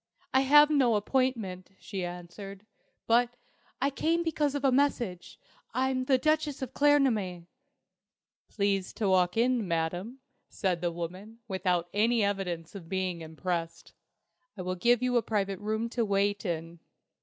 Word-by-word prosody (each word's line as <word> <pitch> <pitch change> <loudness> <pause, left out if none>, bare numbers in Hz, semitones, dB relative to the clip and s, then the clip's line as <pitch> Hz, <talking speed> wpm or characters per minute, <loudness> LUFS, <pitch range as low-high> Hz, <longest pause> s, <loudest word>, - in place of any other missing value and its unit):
"I 265 - +5
have 295 +3 +6
no 260 -6 +4
appointment," 210 -5 -1
she 190 -2 -5
answered. 180 +3 -8 0.4
"But 240 +1 +3 0.4
I 280 - +1
came 330 +4 0
because 300 -3 0
of 285 -1 -1
a 270 - +5
message. 245 -9 0 0.4
I'm 260 0 0
the 265 0 +4
Duchess 305 -1 0
of 260 - -6
Claremanagh." 235 -12 +2 1.0
"Please 200 -2 0
to 215 - -1
walk 180 0 +3
in, 240 -3 +2
Madam," 175 +8 -2 0.3
said 180 -5 -1
the 175 -1 0
woman, 185 +6 -7
without 180 -3 0
any 225 +2 +3
evidence 180 -5 -2
of 180 -5 -10
being 185 -3 -2
impressed. 165 +1 -4 0.6
"I 185 - -5
will 185 0 -2
give 235 +7 +2
you 250 -1 +2
a - - +4
private 200 -4 -1
room 220 +2 -2
to 235 0 -1
wait 205 0 0
in." 165 0 -4
205 Hz, 145 wpm, -29 LUFS, 180-255 Hz, 1.0 s, have